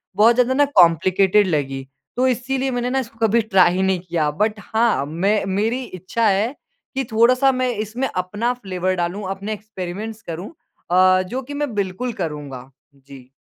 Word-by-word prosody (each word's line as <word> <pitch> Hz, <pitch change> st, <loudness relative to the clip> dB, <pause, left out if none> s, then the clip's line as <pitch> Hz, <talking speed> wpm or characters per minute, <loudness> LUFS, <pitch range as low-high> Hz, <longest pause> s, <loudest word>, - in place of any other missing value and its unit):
बहुत 225 Hz, +4 st, +5 dB
ज़्यादा 250 Hz, +1 st, +2 dB
ना 290 Hz, +2 st, +4 dB
कॉम्प्लिकेटेड 185 Hz, +4 st, +4 dB
लगी, 135 Hz, -5 st, -2 dB, 0.3 s
तो 255 Hz, +1 st, +2 dB
इसीलिए 260 Hz, +2 st, -1 dB
मैंने 245 Hz, 0 st, -1 dB
ना 265 Hz, +1 st, 0 dB
इसको 230 Hz, -3 st, -7 dB
कभी 230 Hz, +2 st, +3 dB
ट्राई 190 Hz, -5 st, +4 dB
ही 190 Hz, -, 0 dB
नहीं 190 Hz, -1 st, +1 dB
किया। 165 Hz, -4 st, -1 dB
बट 210 Hz, +6 st, -1 dB
हाँ 225 Hz, -10 st, +2 dB
मैं, 195 Hz, +8 st, 0 dB
मेरी 215 Hz, +7 st, -1 dB
इच्छा 200 Hz, +2 st, -2 dB
है 210 Hz, +7 st, +1 dB, 0.4 s
कि 270 Hz, -, 0 dB
थोड़ा-सा 250 Hz, +4 st, +4 dB
मैं 255 Hz, -1 st, 0 dB
इसमें 220 Hz, +5 st, -2 dB
अपना 205 Hz, +7 st, -1 dB
फ्लेवर 185 Hz, -5 st, -2 dB
डालूँ 180 Hz, +3 st, -3 dB
अपने 195 Hz, +2 st, -4 dB
एक्सपेरिमेंट्स 210 Hz, +1 st, -7 dB
करूँ 175 Hz, -, -7 dB, 0.4 s
आ, 185 Hz, +1 st, +5 dB
जो 235 Hz, +8 st, -4 dB
कि 275 Hz, +3 st, -9 dB
मैं 285 Hz, -4 st, -3 dB
बिल्कुल 200 Hz, +5 st, -2 dB
करूँगा। 145 Hz, -5 st, -6 dB, 0.3 s
जी। 135 Hz, -2 st, -15 dB
205 Hz, 170 wpm, -21 LUFS, 180-240 Hz, 0.4 s, बहुत